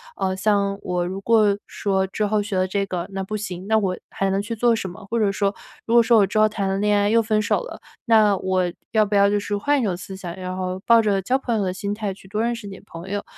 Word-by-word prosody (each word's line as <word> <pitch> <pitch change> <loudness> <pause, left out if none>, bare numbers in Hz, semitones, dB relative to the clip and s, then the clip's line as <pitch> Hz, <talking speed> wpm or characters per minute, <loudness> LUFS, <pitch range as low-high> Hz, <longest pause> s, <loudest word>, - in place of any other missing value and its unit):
呃， 190 0 -1
像 200 0 +1
我 180 -1 -1
如 190 +2 -4
果 210 -2 +4
说 190 -2 0
之 210 +3 -2
后 210 0 +1
学 200 -2 -4
了 185 0 +1
这 200 +1 -1
个 180 -1 -3
那 195 0 -3
不 215 +3 -5
行， 190 -3 -6
那 220 - +3
我 190 -3 -1 0.2
还 195 0 -1
能 195 +1 +1
去 230 +3 -5
做 235 +1 +3
什 195 -4 -4
么？ 180 +3 -11
或 235 - 0
者 205 -2 +2
说 200 0 -1 0.3
如 230 - 0
果 235 - +8
说 230 0 +4
我 200 - +5
之 210 - -3
后 215 - +6
谈 200 -2 -2
了 195 - 0
恋 210 0 +2
爱 205 - +2
又 230 +2 +4
分 215 -1 +1
手 205 - +1
了， - - -8 0.3
那 215 -3 +5
我 185 0 0 0.3
要 215 -1 +4
不 205 - -1
要 200 0 +5
就 205 0 +1
是 205 0 -3
换 285 +7 +1
一 - - -1
种 185 -5 -1
思 190 +1 -8
想， 180 -2 -7
然 185 0 -5
后 185 0 -3
抱 230 -1 +6
着 205 -3 +1
交 260 +6 +1
朋 240 -4 -1
友 205 - 0
的 185 -1 -1
心 200 +1 -3
态 210 -2 -3
去 190 - -17
多 210 +3 -2
认 235 0 0
识 220 -3 -9
点 195 - -10
朋 170 +3 -10
友。 205 0 -2
200 Hz, 310 characters per minute, -22 LUFS, 190-215 Hz, 0.3 s, 果